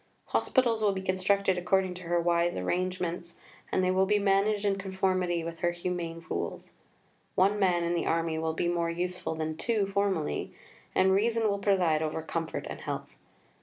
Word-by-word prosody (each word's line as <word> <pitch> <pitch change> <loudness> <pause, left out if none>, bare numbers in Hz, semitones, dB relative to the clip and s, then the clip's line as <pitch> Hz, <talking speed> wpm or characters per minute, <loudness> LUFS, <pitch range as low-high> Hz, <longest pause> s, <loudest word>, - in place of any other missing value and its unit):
Hospitals 235 -4 +2
will 205 -2 +3
be 190 - -3
constructed 190 0 +1
according 185 +1 +1
to 180 - -10
her 175 +1 +1
wise 170 0 +1
arrangements, 175 - -2 0.3
and 185 - +2
they 185 - +3
will 190 +1 +3
be 210 +1 +3
managed 200 +1 +2
in 200 -1 +1
conformity 185 -3 0
with 165 0 -6
her 175 - +2
humane 175 -1 -4
rules. - - -4 0.6
One 200 +3 +3
man 180 -3 +3
in 170 0 0
the 170 - -1
army 165 -1 0
will 160 0 -1
be 165 - -1
more 170 -1 0
useful 175 -1 -3
than 155 0 -3
two 220 +1 +1
formerly, 195 -5 -1 0.4
and 190 0 +4
reason 225 +3 +2
will 200 -1 0
preside 180 -6 +2
over 160 0 -2
comfort 165 0 -3
and - - -6
health. - - -5
180 Hz, 175 wpm, -29 LUFS, 170-195 Hz, 0.6 s, and